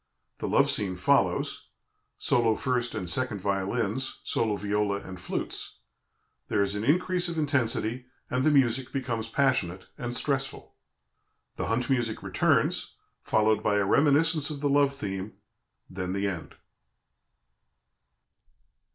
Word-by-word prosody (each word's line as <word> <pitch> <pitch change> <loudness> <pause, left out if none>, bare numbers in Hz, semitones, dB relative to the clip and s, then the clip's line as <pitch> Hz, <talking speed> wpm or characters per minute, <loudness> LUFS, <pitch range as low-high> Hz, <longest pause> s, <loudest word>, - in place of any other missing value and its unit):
The - - -3
love - - +4
scene 95 -3 -1
follows 90 - +1 0.5
solo 115 -2 +2
first 125 -2 -1
and 95 -4 -3
second 110 +3 0
violins, 100 +5 -1
solo 110 -2 0
viola, 105 0 0
and 95 -1 -9
flutes; - - -4 0.7
there 100 - +2
is 100 0 -1
an 105 0 -3
increase 175 +5 +2
of 170 - -4
intensity, 125 -4 0 0.2
and 125 +1 0
the 155 - +5
music 130 -3 +2
becomes 120 -5 -2
passionate 110 -8 +1
and 120 0 -3
stressful. 135 -1 -2 0.8
The - - -3
hunt 120 +2 0
music 120 -4 0
returns, - - +1 0.3
followed 110 0 +2
by 105 - +1
a 100 -1 +2
reminiscence 150 - +3
of 150 -2 -5
the 145 0 0
love 140 -1 +4
theme; 100 -6 -5 0.5
then 90 0 -4
the 100 +1 0
end. 90 -5 -5
115 Hz, 130 wpm, -28 LUFS, 100-135 Hz, 0.8 s, the